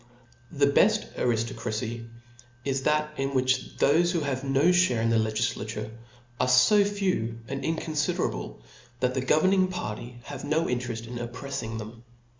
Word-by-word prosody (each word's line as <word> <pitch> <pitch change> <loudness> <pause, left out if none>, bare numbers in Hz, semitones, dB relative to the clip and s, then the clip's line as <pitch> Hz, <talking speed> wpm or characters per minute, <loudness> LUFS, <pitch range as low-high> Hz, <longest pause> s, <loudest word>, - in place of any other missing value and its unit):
The 140 -1 +3
beft 205 +10 +3
ariftocracy 115 0 -2 0.6
is 135 -1 0
that 150 +1 +1
in 135 0 -1
which 130 0 0
thofe 165 +5 +4
who 170 - 0
have 135 -2 -2
no 135 +1 +1
fhare 175 -9 +3
in 115 0 +1
the 115 - +3
legiflature, 110 -1 -2 0.5
are 125 - +2
fo 130 +12 +6
few 185 - -1
and 135 +2 -4
in 165 - 0
conflderable, 145 - -2 0.4
that 125 0 +1
the 130 - -1
governing 185 +8 +3
party 125 - -5
have 140 0 -8
no 160 +2 +1
in 125 0 0
tcreft 120 -2 -5
in 120 +1 -7
opprefling 120 -1 -5
them. 115 +2 -9
130 Hz, 155 wpm, -27 LUFS, 115-150 Hz, 0.6 s, fo